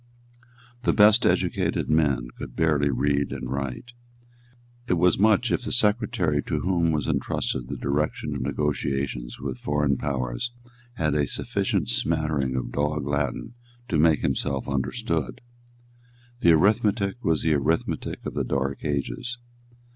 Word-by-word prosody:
The - - +2
best 105 0 +6
educated - - 0
men 70 -6 +2
could - - -8
barely 75 -3 +2
read 70 +1 0
and 60 - -5
write. 70 - -4 0.9
It 90 - +2
was 90 +1 +3
much 110 +3 +3
if - - +1
the - - -4
secretary 105 -9 +1
to - - -2
whom 85 -3 +1
was 75 -2 -1
entrusted 60 -2 -1
the - - -5
direction 75 +3 -1
of - - -4
negotiations 70 -2 -2
with 65 -2 -5
foreign 75 0 +1
powers 65 - -2 0.4
had 75 -9 0
a 75 -1 +1
sufficient - - -1
smattering 70 0 0
of 65 -2 -3
Dog 75 +1 -1
Latin 70 - -2 0.4
to 80 - +1
make 80 -1 +4
himself 70 0 -1
understood. 70 +2 -2 1.0
The 85 - +5
arithmetic 105 +5 +2
was 80 -2 +1
the 80 - +3
arithmetic 75 +3 -1
of - - -4
the - - -1
dark 70 0 -2
ages. 75 - -3
75 Hz, 140 wpm, -25 LUFS, 70-85 Hz, 1.0 s, best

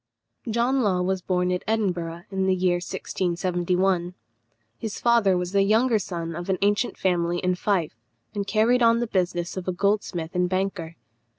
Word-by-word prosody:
John 240 +4 +1
Law 185 -5 +1
was 190 0 -1
born 180 0 0
at 180 - -1
Edinburgh 175 -6 -1
in 190 -1 0
the 190 - +3
year 180 -1 +2
1671. 180 0 -1 0.6
His 220 -2 -5
father 230 -6 +3
was 180 0 -3
the 200 0 +3
younger 220 +3 +3
son 170 -3 -5
of 175 +3 -6
an 190 - +1
ancient 205 +4 +1
family 175 -2 0
in 180 +1 0
Fife, 180 - 0 0.4
and 200 -1 -3
carried 225 +5 +3
on 230 0 +5
the 240 - 0
business 180 -4 -1
of 185 - -5
a - - +1
goldsmith 185 -3 -1
and 180 -1 +1
banker. 185 -3 -2
185 Hz, 170 wpm, -25 LUFS, 175-205 Hz, 0.6 s, on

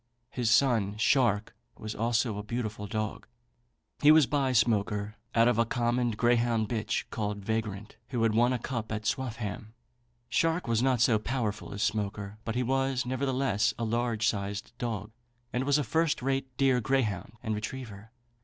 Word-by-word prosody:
His 120 -3 0
son 110 -5 +3
Shark 115 -3 +2 0.2
was 110 0 -5
also 115 -1 0
a - - -5
beautiful 110 -2 -4
dog. 110 +1 -3 0.7
He 145 - +6
was 155 -2 +7
by 140 -1 +1
Smoaker 105 -3 +1 0.2
out 115 0 +5
of 120 -2 +2
a - - +6
common 120 +1 +1
greyhound 115 0 +2
bitch, 110 -2 -2
called 105 -2 -3
Vagrant, 110 -2 -3
who 120 -3 -1
had 115 -1 +3
won 120 +3 +4
a 125 - +1
cup 115 -2 -4
at 110 0 -3
Swaffham. 110 -1 -3 0.5
Shark 165 +6 +1
was 115 -1 +2
not 130 -2 +2
so 115 -3 +4
powerful 110 -3 -3
as 100 - -2
Smoaker; 105 -1 -2
but 115 - -3
he 125 - +1
was, 135 0 0
nevertheless, 130 -4 0
a 115 - -3
large 115 -1 0
sized 100 +1 -3
dog, 110 -3 -3 0.4
and 125 +2 0
was 145 +1 +4
a 150 - +1
first 160 +2 0
rate 135 0 0
deer 130 -2 +3
greyhound 110 -7 0
and 110 -2 -1
retriever. 110 -1 -6
115 Hz, 165 wpm, -29 LUFS, 105-125 Hz, 0.7 s, was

